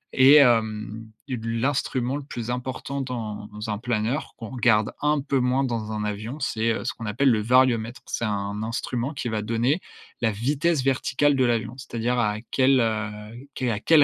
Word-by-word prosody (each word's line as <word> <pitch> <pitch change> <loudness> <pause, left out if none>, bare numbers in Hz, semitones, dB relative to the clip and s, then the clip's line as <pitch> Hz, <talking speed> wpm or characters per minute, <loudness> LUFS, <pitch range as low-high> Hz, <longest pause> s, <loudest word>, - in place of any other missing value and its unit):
et 135 +3 +8
hem, 110 -4 +3 0.2
lu 115 -3 -3
l'instrument 130 -1 0
le 145 - -6
plus 120 -3 -5
important 130 +2 -4
dans 110 -5 -5
dans 105 +1 -6
un 105 - -3
planeur, 120 +3 -2
qu'on 115 -3 -7
regarde 110 -4 +2
un 150 0 +2
peu 140 -1 0
moins 125 +2 +2
dans 115 -4 -2
un 105 -1 -2
avion, 110 +7 -4
c'est, 115 -4 0
heu, - - -3
ce - - -1
qu'on 115 - -7
appelle 130 +5 +3
le 110 -2 +2
variomètre. 120 0 +2
C'est 120 - -2
un 100 0 -2
instrument 120 +4 -3
qui 125 - -3
va 110 -1 -1
donner 115 - +1 0.4
la 115 - +3
vitesse 140 +7 0
verticale 135 +1 +2
de 130 - +2
l'avion, 120 0 0
c'est-à-dire 120 -1 -2
à 105 -2 +1 0.2
quel, 130 0 +4
heu, 110 -2 0 0.5
quel 125 -2 0
à 105 - -2
quel 155 +4 +5
à - - +9
120 Hz, 190 wpm, -25 LUFS, 110-130 Hz, 0.5 s, à